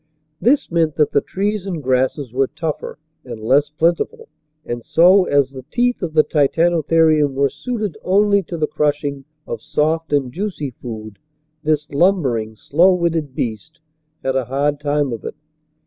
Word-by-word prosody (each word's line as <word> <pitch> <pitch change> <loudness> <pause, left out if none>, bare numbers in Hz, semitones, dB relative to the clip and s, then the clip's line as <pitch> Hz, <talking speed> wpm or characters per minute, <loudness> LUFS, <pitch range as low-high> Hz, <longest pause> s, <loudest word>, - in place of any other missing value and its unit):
This 265 -1 +2
meant 165 -3 +1
that 150 -2 +2
the 140 - +3
trees 200 0 -2
and 170 -6 -4
grasses 130 0 0
were 135 +1 +2
tougher 160 +1 -5 0.3
and 120 -3 -8
less 140 +7 +2
plentiful, 170 - -1 0.4
and 120 -1 -5
so, 180 - +5
as 140 -4 +2
the 130 -1 -9
teeth 245 +4 0
of 170 -4 -3
the 155 - +6
Titanotherium 160 -1 +2
were 140 -1 +2
suited 210 - -4
only 200 +1 +3
to 170 -1 -7
the 155 - +1
crushing 145 -2 -1 0.2
of - - -5
soft 155 +1 -1
and 135 -4 0
juicy 175 -7 -4
food, 110 -4 -9 0.4
this 150 -1 0
lumbering, 140 - +1
slow 170 - +3
witted 165 -6 -1
beast 120 +9 -4 0.4
had 135 0 -1
a 130 -2 0
hard 140 +3 -1
time 145 -3 0
of 115 - -7
it. - - -6
150 Hz, 160 wpm, -19 LUFS, 135-170 Hz, 0.4 s, the